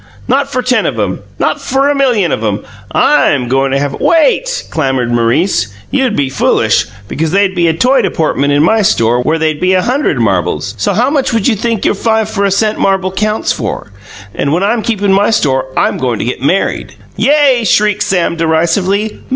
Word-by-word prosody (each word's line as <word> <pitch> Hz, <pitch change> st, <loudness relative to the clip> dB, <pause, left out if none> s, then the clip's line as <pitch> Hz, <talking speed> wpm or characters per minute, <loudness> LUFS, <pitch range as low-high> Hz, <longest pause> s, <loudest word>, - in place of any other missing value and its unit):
"Not 275 Hz, +1 st, 0 dB
for 255 Hz, -2 st, -1 dB
ten 250 Hz, 0 st, +1 dB
of -, -, -3 dB
'em; -, -, -2 dB, 0.2 s
not -, -, -1 dB
for 270 Hz, +2 st, 0 dB
a 290 Hz, -, +2 dB
million 245 Hz, -, +1 dB
of 110 Hz, -, -2 dB
'em! 105 Hz, -1 st, -1 dB, 0.3 s
I'm 145 Hz, -, +2 dB
goin' 135 Hz, +2 st, +1 dB
to 135 Hz, -, 0 dB
have 140 Hz, 0 st, -2 dB
" -, -, -8 dB
"Wait!" -, -, +1 dB
clamoured 135 Hz, -6 st, -1 dB
Maurice. 120 Hz, -, +1 dB, 0.2 s
"You'd 260 Hz, -5 st, 0 dB
be 140 Hz, -2 st, 0 dB
foolish, 130 Hz, -1 st, +1 dB, 0.2 s
because 160 Hz, +8 st, -2 dB
they'd 195 Hz, +2 st, +1 dB
be 175 Hz, -2 st, +1 dB
a 165 Hz, -, +2 dB
toy 255 Hz, +9 st, +2 dB
deportment 145 Hz, -3 st, 0 dB
in 145 Hz, +1 st, +3 dB
my 220 Hz, +6 st, +3 dB
store 120 Hz, -, +2 dB
where 155 Hz, +6 st, 0 dB
they'd 155 Hz, -2 st, -1 dB
be 185 Hz, +1 st, +2 dB
a 185 Hz, -, +1 dB
hunderd 250 Hz, -, 0 dB
marbles! 100 Hz, -4 st, -1 dB
So, 100 Hz, -, 0 dB
how 250 Hz, +5 st, +1 dB
much 270 Hz, -4 st, 0 dB
would 225 Hz, -3 st, +1 dB
you 240 Hz, -, +2 dB
think 225 Hz, 0 st, -2 dB
your -, -, +2 dB
five 220 Hz, +1 st, 0 dB
for 200 Hz, -2 st, 0 dB
a -, -, +2 dB
cent 215 Hz, +2 st, 0 dB
marble 190 Hz, -1 st, 0 dB
counts 215 Hz, +3 st, -1 dB
for? 110 Hz, -2 st, -4 dB, 0.4 s
And 140 Hz, -, -2 dB
when 175 Hz, +5 st, 0 dB
I'm 225 Hz, +3 st, +1 dB
keepin' 205 Hz, -3 st, 0 dB
my 200 Hz, +2 st, +2 dB
store 135 Hz, -11 st, +1 dB
I'm -, -, +1 dB
goin' 125 Hz, -3 st, -1 dB
to -, -, -3 dB
get 125 Hz, -, -4 dB
married." 180 Hz, +8 st, -1 dB, 0.2 s
"Yay!" 280 Hz, -4 st, +3 dB
shrieked 210 Hz, 0 st, +1 dB
Sam 175 Hz, -3 st, 0 dB
derisively. 170 Hz, +6 st, 0 dB
190 Hz, 205 wpm, -12 LUFS, 140-230 Hz, 0.4 s, in